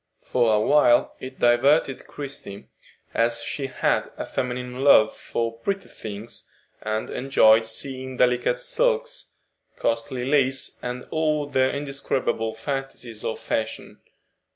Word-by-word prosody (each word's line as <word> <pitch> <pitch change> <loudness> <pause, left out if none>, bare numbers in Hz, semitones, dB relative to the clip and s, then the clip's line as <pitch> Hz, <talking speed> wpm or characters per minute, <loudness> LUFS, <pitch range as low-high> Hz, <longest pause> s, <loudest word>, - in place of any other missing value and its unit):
For 115 -3 +2
a - - +3
while 120 +1 +4
it 130 0 -8
diverted 135 +3 +3
Christie, 135 -8 -7 0.5
as 115 0 +1
she 135 +3 -3
had 130 - 0
a - - -4
feminine 125 +1 -3
love 110 -6 +6
for 115 0 -3
pretty 195 +8 -3
things, 110 +2 -7 0.3
and 110 0 -3
enjoyed 115 -4 +4
seeing 130 +2 -4
delicate 125 0 +2
silks, - - -1 0.4
costly 125 +2 -1
lace, 135 -1 +1
and 125 0 -5
all 155 -2 +1
the 130 -2 +2
indescribable 135 -5 -2
fantasies 125 -2 -5
of 110 - -2
fashion. 110 0 -3
125 Hz, 120 wpm, -24 LUFS, 115-140 Hz, 0.5 s, love